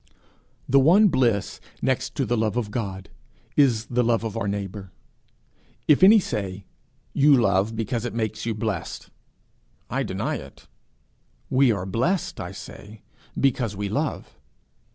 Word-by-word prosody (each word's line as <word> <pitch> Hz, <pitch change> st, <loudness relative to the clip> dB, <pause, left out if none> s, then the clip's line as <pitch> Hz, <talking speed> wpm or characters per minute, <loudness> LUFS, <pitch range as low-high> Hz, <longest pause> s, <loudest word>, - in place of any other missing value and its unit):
The 135 Hz, +2 st, +5 dB
one 185 Hz, +10 st, +6 dB
bliss, 120 Hz, -, 0 dB, 0.2 s
next -, -, -1 dB
to -, -, 0 dB
the 120 Hz, -, 0 dB
love 110 Hz, 0 st, 0 dB
of 110 Hz, -4 st, -2 dB
God, 95 Hz, -5 st, -5 dB, 0.4 s
is 120 Hz, -7 st, +3 dB
the 125 Hz, +1 st, 0 dB
love 115 Hz, -1 st, +1 dB
of 110 Hz, -3 st, -4 dB
our 100 Hz, -, -2 dB
neighbour. 100 Hz, -1 st, -5 dB, 1.0 s
If 150 Hz, -, +5 dB
any 210 Hz, +4 st, +8 dB
say, 100 Hz, -, -4 dB, 0.5 s
'You 140 Hz, -1 st, +5 dB
love 100 Hz, 0 st, +1 dB
because 115 Hz, +1 st, -2 dB
it 120 Hz, -2 st, -4 dB
makes 110 Hz, -1 st, -2 dB
you 115 Hz, -1 st, -2 dB
blessed,' 105 Hz, -5 st, -4 dB, 0.8 s
I -, -, 0 dB
deny -, -, -2 dB
it: -, -, -13 dB, 0.8 s
'We 130 Hz, -1 st, +4 dB
are 95 Hz, -3 st, -4 dB
blessed, 125 Hz, -, -1 dB
I -, -, -5 dB
say, 105 Hz, +1 st, -11 dB, 0.4 s
because 125 Hz, -6 st, +1 dB
we 100 Hz, 0 st, -3 dB
love.' 105 Hz, -, -3 dB
115 Hz, 145 wpm, -24 LUFS, 100-130 Hz, 1.0 s, any